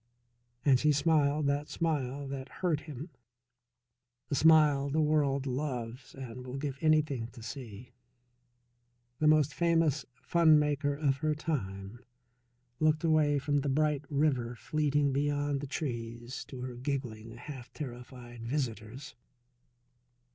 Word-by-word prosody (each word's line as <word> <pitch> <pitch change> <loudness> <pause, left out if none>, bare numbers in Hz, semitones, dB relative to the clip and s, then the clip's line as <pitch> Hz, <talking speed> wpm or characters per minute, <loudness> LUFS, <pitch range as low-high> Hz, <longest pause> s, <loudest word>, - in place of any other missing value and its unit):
And 135 -3 +5
she 150 +2 +4
smiled 150 0 +2
that 140 +1 0
smile 145 -4 -1
that 135 -1 -6
hurt 170 -5 -1
him, 150 +2 -8 1.2
the - - -2
smile 150 -2 +5
the 155 +3 0
world 145 -3 +2
loves 125 -2 -4
and 125 -2 -7
will 130 +1 -6
give 140 -1 -3
anything 150 -7 +2
to 120 -3 -11
see. 120 -2 -8 1.3
The 155 - +3
most 150 -2 +4
famous 165 -3 +2 0.2
funmaker 150 -4 +3
of 140 -2 +1
her 155 +1 0
time 105 -9 -4 0.8
looked 155 0 +2
away 155 -3 +3
from 145 +1 0
the 140 0 -1
bright 150 0 +1
river 135 -5 +1
fleeting 145 +1 +1
beyond 145 0 0
the 145 - -5
trees 120 -3 -5
to 125 0 -8
her 125 0 -5
giggling, 120 -4 -4
half 130 -1 -9
terrified 125 -3 -8
visitors. 120 -1 -4
140 Hz, 125 wpm, -31 LUFS, 125-150 Hz, 1.3 s, And